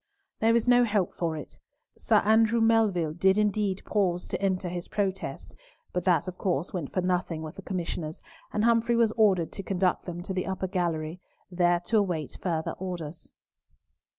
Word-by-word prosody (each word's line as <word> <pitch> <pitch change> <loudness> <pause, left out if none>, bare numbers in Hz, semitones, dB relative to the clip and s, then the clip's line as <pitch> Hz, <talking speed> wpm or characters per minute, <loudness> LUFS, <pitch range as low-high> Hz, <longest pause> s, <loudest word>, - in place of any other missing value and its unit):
There 225 +1 +4
was 235 +1 +2
no 245 0 +6
help 205 -6 0
for 165 -2 -2
it. 150 - -10 0.4
Sir - - +3
Andrew 225 +2 +4
Melville 215 -8 +3
did 190 +4 +3
indeed 210 -2 +1
pause 180 -4 0
to - - -3
enter 190 -2 0
his 175 0 -5
protest, 195 -2 -3 0.4
but 180 -1 -2
that, 180 0 +3
of 185 0 -6
course, 175 -3 -1
went 170 -7 -4
for 185 - 0
nothing 180 -3 -1
with 155 - -7
the - - -7
Commissioners, 170 -4 -4 0.3
and 210 - 0
Humfrey 235 0 +3
was 230 -2 +3
ordered 200 -7 +3
to - - -6
conduct 185 -2 0
them 175 -1 -5
to 190 - -4
the 185 -1 -2
upper 190 0 -2
gallery, 170 -3 -2 0.3
there 175 -1 +3
to 220 +4 +2
await 175 -7 -2
further 165 -3 -1
orders. 175 -4 -6
185 Hz, 180 wpm, -28 LUFS, 175-210 Hz, 0.4 s, no